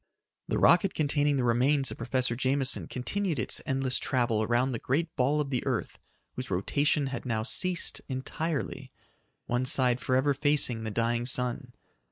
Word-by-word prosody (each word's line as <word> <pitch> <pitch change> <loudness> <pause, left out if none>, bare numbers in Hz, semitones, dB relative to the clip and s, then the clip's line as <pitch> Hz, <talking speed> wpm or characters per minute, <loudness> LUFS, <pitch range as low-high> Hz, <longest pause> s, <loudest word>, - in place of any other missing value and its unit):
The - - -1
rocket 195 -3 +4
containing 145 -1 +1
the 130 - 0
remains 130 +4 +2
of - - -7
Professor 125 0 0
Jameson 130 +1 0
continued 175 +6 -2
its - - -2
endless 135 -2 +1
travel 120 -4 0
around 120 +4 +1
the 120 - -3
great 160 +5 -1
ball 140 +3 +2
of 145 -2 -2
the 125 - -1
earth - - -3 0.3
whose 125 -1 -6
rotation 140 - +1
had 120 - -4
now 110 -3 -1
ceased 180 +8 -1
entirely 135 0 -4 0.5
one 120 +1 0
side 125 -1 +3
forever 130 +3 +2
facing 135 -5 0
the - - -2
dying 115 +2 -1
sun. 125 0 -2
130 Hz, 160 wpm, -28 LUFS, 120-145 Hz, 0.5 s, rocket